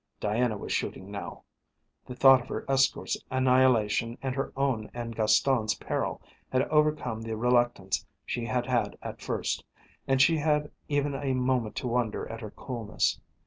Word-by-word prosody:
Diana 110 +1 0
was - - -6
shooting 95 +2 -3
now. 100 - -7 0.6
The 125 - -7
thought 135 0 +7
of - - -12
her - - -4
escort's 135 0 +2
annihilation 125 -3 +3
and 130 -1 -1
her 135 +1 -2
own 130 -6 0
and 115 -1 -5
Gaston's 110 0 +3
peril - - -3 0.3
had 130 0 +3
overcome 150 -7 +1
the 115 -1 -4
reluctance 120 -5 +1 0.2
she 120 - -3
had 120 +1 -1
had 125 -2 0
at - - -7
first, - - -2 0.4
and 135 -1 +2
she 160 +4 +5
had 150 -1 +1 0.2
even 145 -1 +1
a 135 -1 -1
moment 125 -3 0
to - - -3
wonder 120 -2 -1
at 115 +1 -7
her 110 - -6
coolness. 115 -2 -2
125 Hz, 160 wpm, -28 LUFS, 115-135 Hz, 0.6 s, thought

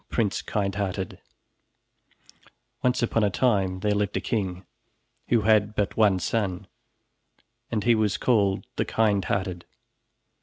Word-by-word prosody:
PRINCE 105 -5 0
KINDHEARTED 100 -2 -3 1.6
Once 125 -1 +1
upon 115 -1 +1
a 105 - +3
time 95 -5 +1
there 105 -1 +1
lived 105 -1 -1
a - - +1
king 95 -5 -3 0.6
who 115 -2 +3
had 105 0 +3
but 105 - -1
one 105 -4 +4
son, 95 0 -2 1.0
and 110 -3 -1
he 120 - +4
was 110 -3 +1
called 100 -6 +1
the - - +1
Kindhearted. 100 -4 0
105 Hz, 120 wpm, -26 LUFS, 95-110 Hz, 1.6 s, one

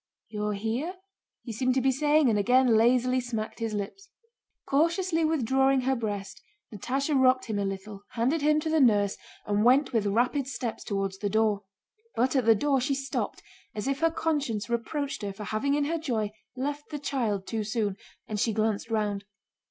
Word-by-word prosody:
"You're 210 -1 -2
here?" 230 - -2 0.5
he 235 - -6
seemed 255 +3 +1
to - - +3
be 265 +1 +3
saying, 295 +2 +3
and 215 -3 +3
again 250 +2 +4
lazily 250 +3 +3
smacked 225 -3 -4
his 225 -2 -2
lips. 300 - -6 0.6
Cautiously 335 +3 +1
withdrawing 270 -3 +2
her 265 +1 +1
breast, 205 -4 -4 0.3
Natásha 270 - -1
rocked 255 -1 +4
him 215 -3 -2
a 200 - 0
little, 195 +1 -5
handed 255 +7 +1
him 300 +1 +3
to 315 - -2
the 320 - +3
nurse, 205 -6 +4 0.3
and 205 0 +1
went 260 +3 +4
with 215 -3 +1
rapid 250 +6 +1
steps 250 -4 -4
toward 195 -1 -2
the 205 - 0
door. 210 -1 +1 0.5
But 255 +4 +1
at 260 -4 +2
the 225 - +7
door 275 +3 +1
she 275 +2 0
stopped 270 0 -3 0.3
as 210 +4 -3
if 275 0 0
her 330 - +3
conscience 290 -10 -1
reproached 275 +5 -2
her 200 -1 -4
for 210 - -8
having 220 +7 0
in 290 -1 +1
her 330 +3 -1
joy 225 -9 -1 0.2
left 285 +3 -4
the 300 - -4
child 235 -9 -1
too 220 0 -2
soon, 210 -2 -1 0.3
and 210 -1 -3
she 225 +1 +1
glanced 215 +1 0
round. 210 -3 -1
245 Hz, 185 wpm, -28 LUFS, 210-280 Hz, 0.6 s, the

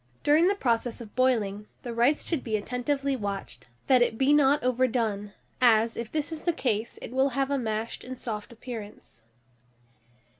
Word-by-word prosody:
During 310 +4 +5
the 400 - +2
process 235 - 0
of 225 -3 -11
boiling, 215 -5 +1 0.2
the 240 - -5
rice 240 +6 +2
should 325 -6 0
be 220 -2 0
attentively 270 +5 -1
watched, 200 - -5 0.2
that 255 -2 +5
it 225 -2 +2
be 270 +3 +4
not 290 -1 +4
overdone, 230 -5 0 0.3
as, 230 -2 +4
if 235 -1 -5
this 305 0 -2
is 320 - -4
the 345 - +1
case, 230 -7 -2
it - - -7
will 265 +2 +2
have 275 0 +1
a 280 - +1
mashed 220 -1 -3
and 255 0 -8
soft 210 -2 -5
appearance. 220 - -9
245 Hz, 175 wpm, -27 LUFS, 220-275 Hz, 0.3 s, During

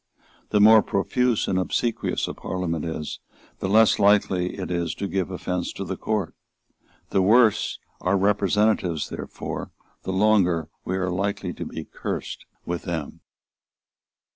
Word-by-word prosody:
The 105 - +2
more 110 +1 +8
profuse 120 +4 0
and 95 - +1
obsequious 115 +5 -1
a - - -4
Parliament 85 -4 -3
is, 80 -2 -4 0.4
the 95 - -2
less 110 +2 +5
likely 100 -3 +3
it 95 -2 -4
is 85 -1 -1
to 100 - -3
give 95 -2 -1
offence 90 -1 -3
to 100 - -5
the 95 +1 -3
Court. 105 -3 -2 0.8
The 95 - +3
worse 110 +2 +4 0.2
our 95 +2 +1
representatives, 100 -3 +1
therefore, - - -6 0.3
the - - -4
longer 95 -5 +2
we 95 - -2
are 90 -1 -1
likely 100 +3 -2
to - - -6
be - - -6
cursed - - -5 0.2
with 85 -1 -3
them. 80 -4 -5
95 Hz, 140 wpm, -24 LUFS, 90-105 Hz, 0.8 s, more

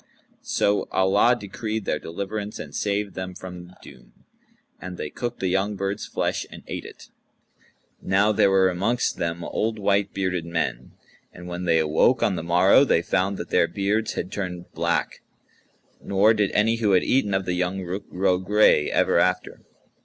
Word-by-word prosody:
So 100 0 0
Allah 100 +6 +3
decreed 110 +1 -4
their 75 - -1
deliverance 100 +4 -5
and 75 - -8
saved 100 +1 -2
them 95 0 -6
from 90 -1 -10
doom; - - -17 0.5
and 90 -1 -8
they 75 - -5
cooked 120 -1 -5
the 95 - 0
young 95 +3 0
bird's 100 +1 -3
flesh - - -2
and - - -12
ate - - -6
it. - - -13 0.9
Now 100 +3 +2
there 100 - +3
were 95 -1 +4
amongst 110 +7 -1
them 85 +1 -3
old 110 +6 -2
white 100 -1 +1
bearded 95 -3 -2
men; 85 -7 -3 0.4
and 90 - -12
when 90 +1 -5
they 85 -2 +3
awoke 80 +11 +2
on 100 - +2
the 85 - -3
morrow, 90 +9 +5
they 85 -11 +2
found 95 +3 0
that - - -7
their - - +3
beards 105 +3 -1
had 90 - -4
turned 90 -3 -5
black, - - -1 0.8
nor 100 +3 +4
did 105 -3 +1
any 115 +2 +2
who 105 -3 +1
had 90 - +4
eaten 105 -7 +1
of 95 -1 -1
the 90 - -1
young 90 +2 -2
Rukh 90 +3 -6
grow 90 0 +1
gray 95 -5 +3
ever - - +2
after. 90 0 0
95 Hz, 175 wpm, -24 LUFS, 90-105 Hz, 0.9 s, morrow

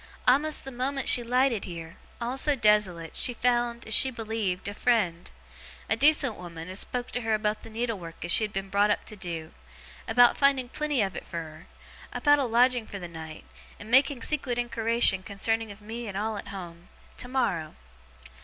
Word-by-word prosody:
A'most 290 +4 +3
the 270 - -7
moment 265 +2 -2
as - - +5
she 245 - +5
lighted 250 -2 +1
heer, 165 -2 -9 0.2
all 240 +2 -3
so 290 +2 +1
desolate, 210 - +1
she 245 - +3
found 240 0 0
(as 220 - -1
she 265 - +7
believed) 220 -6 -3
a 205 - -4
friend; 205 -8 0 0.6
a - - +1
decent 280 -2 +3
woman 170 -2 -9
as 190 +2 +2
spoke 245 0 -3
to 245 - -2
her 225 -1 +1
about 215 0 -2
the - - -11
needle 225 -1 -3
work 165 -1 -9
as 175 - 0
she 220 - +5
had 210 - -2
been 195 0 -5
brought 205 +1 +3
up 210 - 0
to 215 - -5
do, 170 -5 -5 0.6
about 245 +1 +5
finding 275 -3 +2
plenty 295 -4 -1
of 190 -3 -4
it - - -8
fur 170 - -6
her, 155 +1 -13 0.5
about 290 -1 +3
a 275 - +1
lodging 245 0 +2
fur 200 - -7
the 175 -3 -7
night, 160 -2 -10 0.3
and 215 +3 -10
making 265 -1 +4
secret 270 -5 0
inquiration 230 -4 +2
concerning 220 +3 -2
of 200 +1 -13
me 230 +2 -7
and 195 -2 -5
all 215 +1 -2
at 205 - -7
home, 175 -3 -9 0.3
tomorrow. 225 -12 -2
225 Hz, 200 wpm, -27 LUFS, 190-245 Hz, 0.6 s, she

